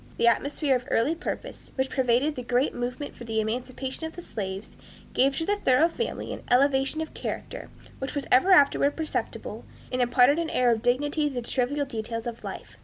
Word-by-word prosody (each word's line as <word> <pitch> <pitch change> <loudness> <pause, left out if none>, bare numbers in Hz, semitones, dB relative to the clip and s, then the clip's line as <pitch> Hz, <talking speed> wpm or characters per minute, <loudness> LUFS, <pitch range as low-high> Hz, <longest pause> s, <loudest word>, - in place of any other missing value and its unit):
The - - +2
atmosphere 275 +4 +2
of 250 0 -3
earnest 305 +9 +1
purpose, - - -6
which 265 0 -1
pervaded 260 +3 +2
the 255 - -5
great 245 +3 +1
movement 250 +4 -4
for - - -10
the 225 -1 -1
emancipation 255 +6 -3
of 320 - -11
the 350 - -8
slaves, 195 - -5 0.4
gave 270 +1 +3
to 325 - -1
the 410 +2 +1
Thoreau 295 -1 +4
family 465 +7 -4
an - - -7
elevation 270 +3 +3
of 320 - -5
character - - -5 0.3
which 265 +2 -4
was 285 - -2
ever 265 +10 +5
afterward 285 -4 +5
perceptible, 320 -1 -4 0.3
and 255 0 0
imparted 245 +5 +4
an 335 -1 -1
air 250 -1 +3
of 225 -1 +1
dignity 290 +5 +1
to 270 - -9
the 245 - -2
trivial 270 +4 0
details 230 -2 -4
of 235 -1 -6
life. - - -8
265 Hz, 195 wpm, -27 LUFS, 245-290 Hz, 0.4 s, ever